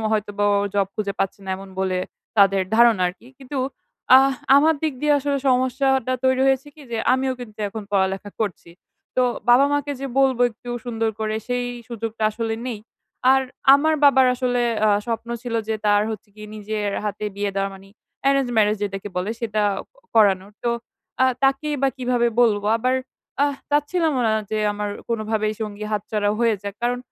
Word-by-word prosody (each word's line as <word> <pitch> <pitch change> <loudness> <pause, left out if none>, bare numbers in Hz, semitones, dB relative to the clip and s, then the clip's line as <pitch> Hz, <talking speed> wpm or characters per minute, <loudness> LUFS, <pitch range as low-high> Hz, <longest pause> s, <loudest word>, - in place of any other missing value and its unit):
হয়তোবা 205 -1 -1
ও - - +3 0.2
জব 200 -1 +2
খুঁজে 200 -2 -2
পাচ্ছে 195 +1 -2
না 190 - -5
এমন 195 0 -10
বলে 185 -1 0 0.4
তাদের 195 -1 +5
ধারণা 230 -5 +5
আরকি। 180 +7 -7
কিন্তু 270 +1 -6 0.6
আহ 270 +1 +5 0.2
আমার 315 +3 +5
দিক 310 -2 0
দিয়ে 300 0 +3
আসলে 280 0 -1
সমস্যাটা 260 0 +2
তৈরি 260 0 +3
হয়েছে 270 +2 +1
কি 305 - -14
যে 230 - -2 0.2
আমিও 260 0 +1
কিন্তু 215 -3 -10
এখন 220 +1 -6
পড়ালেখা 195 +1 0
করছি। 180 -5 -3 0.5
তো 255 - +4 0.3
বাবা-মাকে 285 +3 +4
যে 275 - -3
বলব 265 -2 +3
একটু 240 +2 -10
সুন্দর 225 -2 -1
করে 215 0 -1
সেই 245 0 -1 0.2
সুযোগটা 225 -1 -5
আসলে 225 +1 -3
নেই। 235 -4 -4 0.5
আর, 265 - +4 0.3
আমার 315 +3 +3
বাবার 265 -2 +6
আসলে 245 -1 0 0.2
আ - - +4 0.2
স্বপ্ন 230 0 -3
ছিল 240 -2 -4
যে 220 - +1
তার 205 0 +4
হচ্ছে 210 -1 -7
গিয়ে 210 0 -10
নিজের 210 -1 -3
হাতে 210 0 -3
বিয়ে 205 0 -1
দেওয়া 195 0 -1
মানে, 195 +1 -14 0.4
arrange 275 -2 +2
marriage 210 -1 +3
যেটাকে 195 0 -5
বলে 185 +4 -1
সেটা 215 -2 -1 0.5
করানোর। 200 -2 +3
তো, 235 - +2 0.5
আ - - +7 0.2
তাকেই 275 +2 +1
বা 275 - +4
কিভাবে 245 -2 +1
বলব? 210 -4 +3
আবার, 255 +3 0 0.5
আহ 285 -1 +2 0.2
চাচ্ছিলামও 295 -1 +1
না 220 - +2 0.2
যে 215 - -1
আমার 205 0 -3 0.2
কোনভাবেই 215 -1 -1
সঙ্গী 210 -1 -5
হাতছাড়া 210 0 -1
হয়ে 230 -2 +3
যাক। 200 0 -5
কারণ, 245 +1 0
225 Hz, 175 wpm, -22 LUFS, 205-260 Hz, 0.6 s, আ